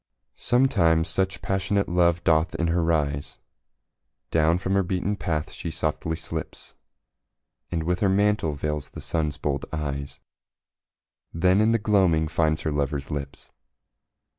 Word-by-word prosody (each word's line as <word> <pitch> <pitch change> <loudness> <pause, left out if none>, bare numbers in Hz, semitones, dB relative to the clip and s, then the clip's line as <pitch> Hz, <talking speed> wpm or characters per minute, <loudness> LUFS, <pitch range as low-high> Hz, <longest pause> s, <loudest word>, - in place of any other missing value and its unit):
Sometimes 90 -11 +3
such 95 +1 -1
passionate 95 +1 0
love 85 -1 +2
doth 80 +2 +2
in 85 0 0
her 85 0 +1
rise, 75 -4 -1 0.9
Down 80 +1 +3
from 95 +1 -2
her 100 - +4
beaten 95 +2 -1
path 80 -3 -2
she 85 - -6
softly 80 +1 -2
slips, 80 - -7 1.0
And 85 -2 -2
with 90 +2 0
her 100 -3 +2
mantle 100 -5 +2
veils 75 0 -3
the - - -10
Sun's 75 -4 -2
bold 70 -2 -2
eyes, 70 -3 -4 1.1
Then 90 +4 +3
in 110 +1 +4
the 115 - +4
gloaming 95 -7 +2
finds 80 -1 +1
her 80 - -2
lover's 70 -1 -2
lips. 70 -2 -6
85 Hz, 140 wpm, -25 LUFS, 75-95 Hz, 1.1 s, her